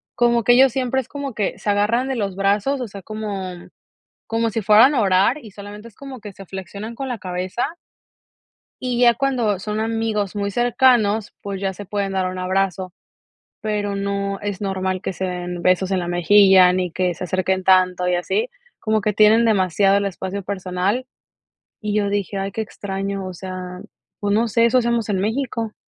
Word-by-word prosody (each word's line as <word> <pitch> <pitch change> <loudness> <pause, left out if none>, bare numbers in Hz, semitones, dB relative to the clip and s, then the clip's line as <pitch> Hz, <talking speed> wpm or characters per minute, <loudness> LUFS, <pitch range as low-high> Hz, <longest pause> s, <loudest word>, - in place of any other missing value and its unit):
Como 235 -1 +3
que 245 - +5
ellos 260 +1 +6
siempre 265 0 0
es 250 - -15
como 280 -2 -5
que 205 - -1
se - - -3
agarran 215 +5 +1
de 265 - -1
los 200 -5 -2
brazos, 205 +8 +1
o 245 - -3
sea, 200 -1 -10
como 195 -4 -6 0.6
como 230 0 0
si 225 - -2
fueran 215 +7 +6
a 245 - +3
orar 195 +6 +3
y 215 - -11
solamente 205 +2 -10
es 220 - -26
como 275 -2 -9
que 205 -1 -9
se 195 - -12
flexionan 200 +4 -7
con 270 +2 -5
la 245 - -3
cabeza 185 +4 -3 1.2
y 250 -1 -1
ya 240 -1 +6
cuando 240 -6 0
son 210 +2 -3
amigos 220 -3 -1
muy 200 0 -2
cercanos, 235 -2 +2
pues, 200 -1 -5
ya 195 -1 -1
se 205 +2 -9
pueden 200 0 -2
dar 190 -1 0
un 185 - -6
abrazo, 185 0 -1 0.7
pero 205 -2 -2
no 200 0 -2
es 205 -2 -4
normal 190 -1 -2
que 190 - -3
se 190 - -4
den 180 -1 -4
besos 185 +1 +2
en 190 -1 +1
la 175 - -4
mejilla, 185 +1 +6
ni 180 -1 -1
que 180 0 0
se 185 - -6
acerquen 185 +1 -1
tanto 185 -1 +3
y 180 - +2
así, 425 - -1 0.3
como 220 -1 0
que 210 0 -1
tienen 220 +3 +5
demasiado 195 -1 +3
el 200 - +1
espacio 195 +1 -4
personal. 190 +5 -2 0.7
Y 210 -1 -3
yo 205 -1 +1
dije: 200 0 -2
"Ay, 195 0 -3
qué 220 - -2
extraño," 195 -2 -4
o 185 - -6
sea, 185 0 -7 0.4
pues, 205 -1 -1
no 230 +2 +2
sé, 230 +2 +3
eso 235 +2 +4
hacemos 235 -2 0
en 195 - 0
México. 225 0 -2
200 Hz, 195 wpm, -21 LUFS, 190-225 Hz, 1.2 s, ellos